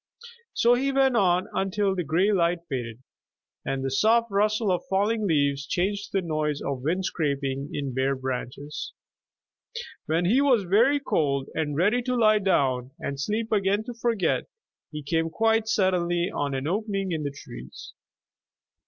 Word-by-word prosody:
So 240 +1 +4
he 270 +3 +1
went 270 -2 +3
on 180 -4 +2
until 195 +1 0
the 180 - -1
gray 170 +7 +2
light 175 -3 +1
faded, 120 -3 -5 0.6
and 135 0 -2
the 135 - -1
soft 230 - +3
rustle 210 +1 +1
of 180 - 0
falling 205 +2 +1
leaves 140 -3 +1
changed 200 +3 -1
to - - -18
the 175 - -8
noise 150 -2 -1
of 135 -2 -4
wind 175 +7 -1
scraping 140 -3 -2
in 140 -3 -3
bare 135 +2 +1
branches. 130 +3 -5 1.1
When 165 +3 +1
he 240 +10 +4
was 255 -7 +3
very 230 +10 +3
cold, 140 - 0
and 150 -2 -2
ready 210 +9 +3
to 250 +1 -1
lie 215 -3 +4
down 130 -10 +1
and 140 -1 -4
sleep 215 +9 -2
again 200 0 +1
to 245 - -7
forget, 230 -4 0 0.4
he 150 -1 -7
came 165 +3 0
quite 225 +4 +1
suddenly 180 -4 +1
on 140 -1 -2
an 135 +1 -3
opening 195 +1 -2
in 160 -2 -2
the 145 - -2
trees. 65 - -11
180 Hz, 160 wpm, -26 LUFS, 140-215 Hz, 1.1 s, So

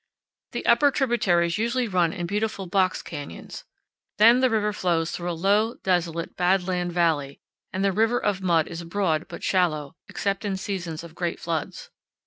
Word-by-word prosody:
The - - -4
upper 290 -2 +5
tributaries 205 - +1
usually 235 +2 0
run 180 -5 +2
in 175 -2 -4
beautiful 205 +1 -2
box 185 +1 +1
canyons. 145 -13 -8 0.5
Then 230 +4 +7
the 260 0 +3
river 210 -2 +1
flows 170 -5 0
through 175 0 -4
a 170 - -3
low, 210 +5 +2
desolate, 170 -3 -1
bad 180 +1 +2
land 180 -1 -1
valley, 160 -5 0 0.3
and 190 +1 -1
the 195 - +3
river 225 +5 +2
of 195 -2 -1
mud 170 -4 +2
is 170 0 -6
broad 165 -2 -1
but - - -9
shallow, 155 -6 +1 0.2
except 200 +1 -2
in 200 -2 -2
seasons 175 -5 -4
of 170 -2 -11
great 170 0 -3
floods. 165 -3 -4
185 Hz, 170 wpm, -25 LUFS, 170-205 Hz, 0.5 s, Then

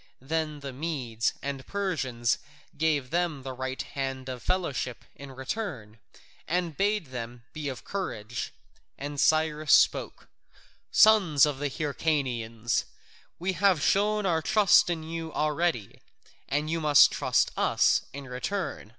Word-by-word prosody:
Then 155 +2 -3
the 140 -1 -6
Medes 125 -6 -2
and 140 -1 -4
Persians 135 - -1 0.4
gave 150 -5 0
them 170 -5 -1
the 130 -1 -5
right 130 +1 -4
hand 135 -1 -4
of 125 -2 -6
fellowship 145 - -2
in 140 -1 -10
return, 130 - -5 0.5
and 170 -2 -1
bade 200 -6 0
them 120 -1 -6
be 150 -2 -4
of 130 - -7
courage. 120 - -4 0.5
And 145 +1 -5
Cyrus 155 -1 +2
spoke: - - +3 0.6
"Sons 190 - +6
of 145 -3 -3
the 145 0 -1
Hyrcanians, 130 -6 -1 0.5
we 185 +2 -1
have 185 -1 +3
shown 210 +1 +2
our 165 -3 +2
trust 205 -1 +5
in 165 -2 -2
you 165 0 -5
already, 150 - -1 0.5
and 145 +2 0
you 165 +1 -1
must 150 -3 +7
trust - - +1
us - - +3
in 140 0 -8
return. 135 - -4
150 Hz, 135 wpm, -28 LUFS, 130-170 Hz, 0.6 s, must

